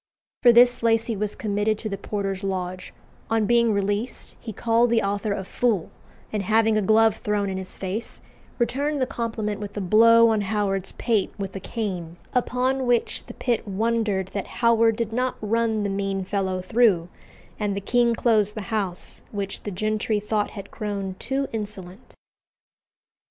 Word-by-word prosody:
For 245 - +8
this 245 +1 +5
Lacy 230 0 +2
was 210 0 -2
committed 210 0 0
to 215 - -5
the 200 - -3
porter's 195 -1 -3
lodge; 185 -1 -3 0.4
on 225 -1 +2
being 235 +1 +4
released, 205 +3 -2
he 225 - -7
called 230 +3 +2
the 230 -1 +2
author 200 +1 -1
a 200 -1 -2
fool, 210 -2 0 0.4
and 210 - 0
having 220 +2 +3
a 215 - +2
glove 220 +1 +4
thrown 205 -2 -1
in 190 - -3
his 185 - -7
face, 195 +5 -4 0.4
returned 280 +5 0
the 260 - +2
compliment 225 -5 -3
with 205 0 -7
a - - 0
blow 230 +4 +6
on 220 -2 +2
Howard's 195 -2 -1
pate 225 -5 0
with 195 -1 -5
a - - -3
cane; 180 -6 -4 0.2
upon 255 +1 0
which 240 -1 0
the - - -9
pit 240 -3 -1
wondered 210 -2 0
that 200 -1 -4 0.2
Howard 230 -1 +5
did 225 -1 -3
not 255 +2 0
run 220 0 0
the 200 - -1
mean 195 -1 -2
fellow 190 -1 -1
through; 195 -5 +3 0.5
and 205 -2 -1
the - - -1
king 235 +3 +2
closed 215 -3 +2
the 215 - -4
house, 195 -5 -3
which 200 -2 -4
the - - -5
gentry 215 +2 0
thought 210 0 -1
had 200 -2 -9
grown 200 -3 -4
too 270 +1 -1
insolent. 205 -1 -7
215 Hz, 170 wpm, -24 LUFS, 195-230 Hz, 0.5 s, For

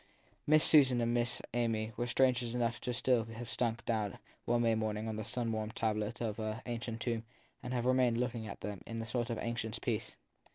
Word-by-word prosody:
Miss 155 +1 +6
Susan 130 -5 +6
and 120 0 +1
Miss 120 0 +1
Amy 115 -2 0
were 120 - -1
strangers 125 -2 +2
enough 120 -1 0
still 125 -1 +2
to 115 +1 -10
have 120 +1 -6
sunk 120 -1 -1
down 110 -4 -1 0.3
one 120 0 +2
May 115 -1 +4
morning 110 0 -1
on 110 - -2
the 110 - -3
sun 115 0 -2
warmed 110 0 -3
tablet 110 -1 -1
of 110 -2 -2
an 110 +1 -2
ancient 115 -1 -4
tomb 115 -2 -1 0.4
and 125 - -6
to 130 - -2
have 120 -1 0
remained 125 -2 +3
looking 120 -2 -2
about 100 - -8
them 100 -1 -5
in 115 0 -4
a 115 - -3
sort 120 +1 -2
of 115 - -1
anxious 115 -2 -2
peace. - - -2
115 Hz, 215 wpm, -34 LUFS, 110-120 Hz, 0.4 s, Miss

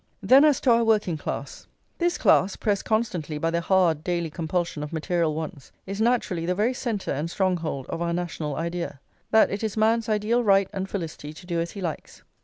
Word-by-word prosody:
Then 270 +3 +7
as 300 -4 +4
to 255 - +4
our 235 0 +4
working 215 -6 +2
class. 150 - -6 0.3
This 345 0 +1
class, 190 +1 +3
pressed 205 -2 -1
constantly 185 -9 -1
by 165 +2 0
the 170 0 0
hard 170 -4 +2
daily 170 -2 -2
compulsion 165 -1 -2
of 150 - -5
material 165 -1 0
wants, 155 -2 -6
is 195 +2 -4
naturally 225 -8 +1
the 180 - +1
very 220 +6 +1
centre 230 -5 -3
and 150 +4 -2
stronghold 170 -8 -1
of 165 - -4
our 170 0 0
national 170 -4 -3
idea, 170 -3 -4 0.3
that 220 - +5
it 200 +2 -3
is 220 -1 -2
man's 225 +1 +2
ideal 215 +3 +1
right 195 -2 +4
and 195 -1 -3
felicity 160 -5 -5
to 180 - -13
do 170 -2 -2
as 170 - -4
he 200 - -7
likes. 165 -4 -6
180 Hz, 205 wpm, -25 LUFS, 165-215 Hz, 0.3 s, Then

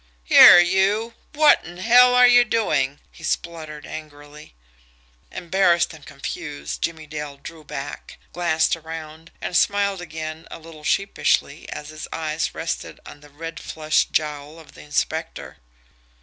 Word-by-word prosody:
"Here 115 - +9
you, 195 +6 +1 0.2
what 305 0 +5
in 175 +2 -11
hell 245 +5 +5
are 250 0 +7
you 245 0 +6
doing!" 150 - 0
he - - -16
spluttered 160 -2 -4
angrily. 150 - -11 0.8
Embarrassed 175 -1 +1
and 155 -2 -14
confused, 75 - -7
Jimmie 160 -2 -3
Dale 150 -2 -7
drew 155 +3 -11
back, 145 0 -8 0.2
glanced 170 -2 +1
around, 160 0 -10
and 180 - -4
smiled 200 0 +1
again 160 -1 -7
a - - -8
little 160 -1 -14
sheepishly 160 -5 0
as 150 - -7
his 155 0 -8
eyes 155 0 -3
rested 165 - -5
on - - -12
the 145 0 -17
red 165 +3 -8
flushed 155 -1 -1
jowl 150 0 -3
of 160 - -15
the - - -13
inspector. 160 +2 -4
160 Hz, 140 wpm, -22 LUFS, 150-175 Hz, 0.8 s, Here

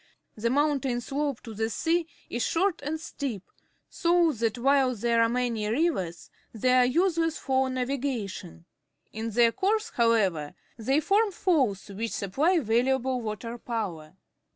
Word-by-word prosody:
The 230 +2 -1
mountain 275 -2 +1
slope 280 +1 -3
to 225 - -9
the 220 +1 -1
sea 330 +8 0 0.2
is 240 - -3
short 365 0 +1
and 300 +3 -3
steep, 265 - -5 0.4
so 340 -1 +2
that 230 -2 -1
while 265 0 +3
there 230 +1 +2
are 230 - +4
many 235 -3 -1
rivers, 215 - -1 0.2
they 250 +3 +1
are 255 -1 +6
useless 330 +3 +1
for 265 -1 0
na\'igation. 250 - -3 0.5
In 225 +1 -3
their 230 +1 +4
course, 435 - 0
however, 195 -10 +1 0.2
they 265 +6 +1
form 415 +5 +3
falls. 275 - +1
which 220 +3 -4
supply 285 - +1
valuable 255 0 +1
water 230 +2 -5
power. 185 -10 -4
250 Hz, 140 wpm, -27 LUFS, 225-295 Hz, 0.5 s, are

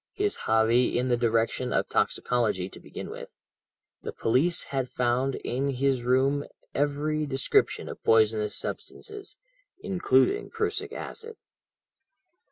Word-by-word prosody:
His 410 +1 0
hobby 115 +3 +3
in 125 +1 0
the 120 - +4
direction 115 +1 0
of - - +1
toxicology, 110 -7 0
to - - -11
begin - - -8
with. - - -8 0.7
The - - -5
police 145 +10 +1
had 130 -2 -1
found 125 +2 0
in 135 +3 -2
his 135 -1 +1
room 130 +3 +2 0.3
every 150 +2 0
description 135 -1 +1
of - - -8
poisonous 110 -1 +3
substances, 420 -2 -7 0.4
including 180 - +2
prussic 430 -1 -2
acid. 455 -1 -6
130 Hz, 120 wpm, -27 LUFS, 120-155 Hz, 0.7 s, the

